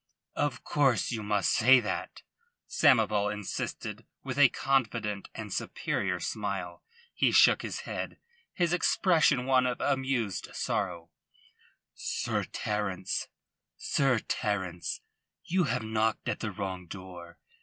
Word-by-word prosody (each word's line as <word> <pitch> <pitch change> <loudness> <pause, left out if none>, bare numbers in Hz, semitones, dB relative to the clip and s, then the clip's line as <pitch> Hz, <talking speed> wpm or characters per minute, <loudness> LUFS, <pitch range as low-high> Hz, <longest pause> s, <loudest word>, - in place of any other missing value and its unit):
"Of 145 -5 -1
course 135 -8 +2
you 115 -3 -2
must 105 -4 +1
say 130 +3 +6
that," 110 -3 -4 0.4
Samoval 105 - +3
insisted, 105 -2 -5 0.2
with 135 0 -4
a 140 -3 +8
confident 115 -7 -1
and - - -6
superior 90 -3 -2
smile. 95 -2 -4 0.3
He - - +2
shook - - +6
his - - -4
head, - - -5 0.3
his 175 -1 0
expression 160 -6 +3
one 130 -1 +4
of 125 - -2
amused 130 -8 -1
sorrow. 85 0 -2 0.8
"Sir - - -3
Terence, 105 -3 -2 2.2
you 180 0 +1
have 125 -3 -1
knocked 110 0 0
at - - -1
the 110 - -2
wrong 95 -2 -5
door. 90 -2 -10
110 Hz, 110 wpm, -29 LUFS, 100-130 Hz, 2.2 s, a